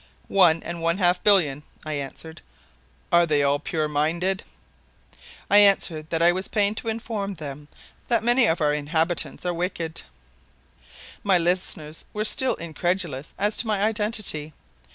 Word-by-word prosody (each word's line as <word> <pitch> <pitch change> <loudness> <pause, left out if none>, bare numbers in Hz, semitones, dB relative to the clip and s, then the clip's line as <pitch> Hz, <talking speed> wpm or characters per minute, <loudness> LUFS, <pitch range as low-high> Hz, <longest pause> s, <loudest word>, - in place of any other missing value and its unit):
"One 170 -4 +4
and 170 0 -6
one 165 +2 +1
half 180 -2 +2
billion," 165 -9 +3 0.2
I 155 - -4
answered. 150 +3 -7 0.7
"Are 170 0 +4
they 145 -2 +2
all 140 +1 +2
pure 155 0 -2
minded?" 170 +6 -1 1.0
I 205 - +6
answered 175 -6 +4
that 165 0 0
I 175 - +6
was 185 +2 -3
pained 205 0 0
to - - -6
inform 220 -3 -3
them 145 -2 -8 0.4
that 235 -2 +1
many 240 0 +4
of 165 -3 0
our 150 -1 +2
inhabitants 160 +5 0
are 175 - 0
wicked. 170 -2 -3 1.2
My 195 -3 +4
listeners 165 -3 -1
were 215 0 -2
still 260 +4 +1
incredulous 170 -3 -3
as 205 +2 +1
to 230 - 0
my 205 -2 0
identity. 210 -8 -1
175 Hz, 150 wpm, -24 LUFS, 155-200 Hz, 1.2 s, I